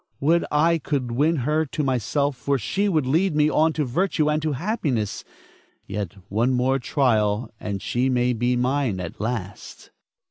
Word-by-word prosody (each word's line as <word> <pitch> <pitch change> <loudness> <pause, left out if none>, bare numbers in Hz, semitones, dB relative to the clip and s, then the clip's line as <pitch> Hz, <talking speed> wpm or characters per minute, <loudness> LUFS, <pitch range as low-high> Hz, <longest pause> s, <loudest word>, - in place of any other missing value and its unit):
Would 165 +4 +2
I 165 +3 +3
could 135 -4 -2
win 150 +7 +2
her 155 +2 +2
to 150 +1 -3
myself, 140 +2 0
for 140 +3 0
she 200 - -1
would 155 -7 +1
lead 160 +6 +1
me 150 0 +3
on 160 +1 +3
to 150 -2 -1
virtue 150 +2 +1
and 155 +1 0
to 155 -1 -1
happiness. 140 - -2 0.6
Yet 100 -2 -4
one 115 +6 +1
more 130 +2 +1
trial 115 -4 +1
and 100 -2 -4
she 125 +2 0
may 125 -1 +2
be 120 +2 0
mine 125 -4 0
at 90 +2 -6
last. 105 -4 -5
130 Hz, 170 wpm, -23 LUFS, 120-150 Hz, 0.6 s, I